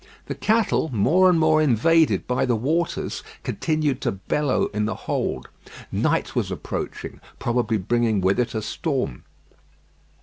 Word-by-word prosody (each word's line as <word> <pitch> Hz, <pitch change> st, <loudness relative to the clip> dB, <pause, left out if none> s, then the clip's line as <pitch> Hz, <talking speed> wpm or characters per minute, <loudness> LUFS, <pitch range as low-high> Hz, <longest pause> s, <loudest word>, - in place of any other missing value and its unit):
The -, -, -4 dB
cattle, 215 Hz, -5 st, +1 dB
more 170 Hz, -, +4 dB
and 175 Hz, -2 st, +3 dB
more 155 Hz, -1 st, +4 dB
invaded 155 Hz, +4 st, +3 dB
by 125 Hz, -, 0 dB
the 120 Hz, -, +2 dB
waters, 160 Hz, +9 st, -1 dB, 0.2 s
continued 155 Hz, -5 st, -1 dB
to -, -, 0 dB
bellow 130 Hz, +8 st, 0 dB
in 105 Hz, 0 st, 0 dB
the 110 Hz, -, -2 dB
hold. -, -, -3 dB, 0.4 s
Night -, -, 0 dB
was -, -, 0 dB
approaching, -, -, -5 dB, 0.2 s
probably 120 Hz, -2 st, 0 dB
bringing 110 Hz, +2 st, +1 dB
with 95 Hz, +3 st, +2 dB
it 120 Hz, -1 st, -1 dB
a 110 Hz, -, -2 dB
storm. 130 Hz, -, -3 dB
125 Hz, 140 wpm, -23 LUFS, 110-160 Hz, 0.4 s, more